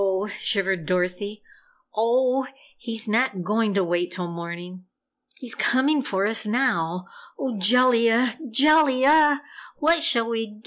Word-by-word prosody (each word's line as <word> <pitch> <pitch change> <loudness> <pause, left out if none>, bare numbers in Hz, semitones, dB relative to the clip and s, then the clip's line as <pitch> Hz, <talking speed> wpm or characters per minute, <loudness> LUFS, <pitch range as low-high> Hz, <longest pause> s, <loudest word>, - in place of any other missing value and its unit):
shivered 190 -5 -1
Dorothy. 185 +4 -2 0.5
"Oh 255 +4 +1 0.3
he's 230 -2 -5
not 215 -4 0
going 210 +1 0
to 195 - +2
wait 175 0 -2
till 180 -1 -5
morning! 170 +2 -8 0.5
He's 250 -3 -7
coming 275 +4 +1
for 195 -6 -2
us 220 +1 -1
now! 210 -7 -1 0.3
Oh, 245 -6 -4
Jellia, 235 +2 +3
JELLIA 290 +2 +4 0.4
what 330 +2 +2
shall 235 -8 +3
we 225 -1 -3
DO?" 210 0 -16
225 Hz, 125 wpm, -23 LUFS, 190-255 Hz, 0.5 s, JELLIA